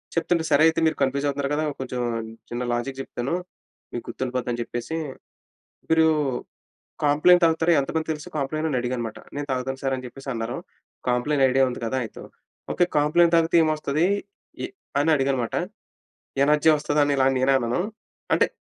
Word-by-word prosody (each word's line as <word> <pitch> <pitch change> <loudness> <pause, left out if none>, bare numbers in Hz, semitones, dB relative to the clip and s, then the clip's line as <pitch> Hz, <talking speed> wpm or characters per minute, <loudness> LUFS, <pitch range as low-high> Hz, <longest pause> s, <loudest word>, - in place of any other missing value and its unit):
చెప్తుంటే 170 0 +1
సరే 145 +1 +5
అయితే 160 0 +2
మీరు 160 - 0
కన్‌ఫ్యూస్ 140 +1 0
అవుతున్నారు 140 0 -2
కదా! 155 - 0 0.2
కొంచెం 125 -1 -3 0.5
చిన్న 120 +1 -2
లాజిక్ 130 +3 -3
చెప్తాను. 135 +2 -4 0.6
మీకు 120 - -4
గుర్తుండిపోతుంది 125 -1 -3
అని 120 - -4
చెప్పేసి, 120 +7 -4 0.9
మీరు 160 0 +5 1.0
కాంప్లెయిన్ 150 +5 +5
తాగుతారా? 165 +1 +3
ఎంతమందికి 160 +4 -2
తెలుసు 150 -1 -7
కాంప్లెయిన్? 155 +2 -1
అని 135 -5 0
అడిగానన్నమాట. 120 -3 -3 0.2
నేను 145 0 -3
తాగుతాను 130 +1 -3
సార్ 135 -1 0
అని 130 - -8
చెప్పేసి 135 +2 -11
అన్నారు. 115 +1 -3 0.5
కాంప్లయిన్ 135 +4 +1
ఐడియా 135 +1 +4
ఉంది 125 - -6
కదా! 130 - -1
అయితే 110 - -9 0.5
ఓకే. 180 - +3
కాంప్లెయిన్ 165 +3 +4
తాగితే 165 0 +3
ఏమొస్తది? 155 0 +1 0.6
ఎ - - 0 0.3
అని 145 +3 +3
అడిగాననమాట. 135 -4 0 0.9
ఎనర్జీ 150 +2 +3
వస్తదా? 150 0 0
అని 145 - +1
ఇలా 130 - +4
నేనన్నాను. 130 -1 +2 0.5
అంటే - - +4
140 Hz, 150 wpm, -24 LUFS, 125-155 Hz, 1.0 s, సరే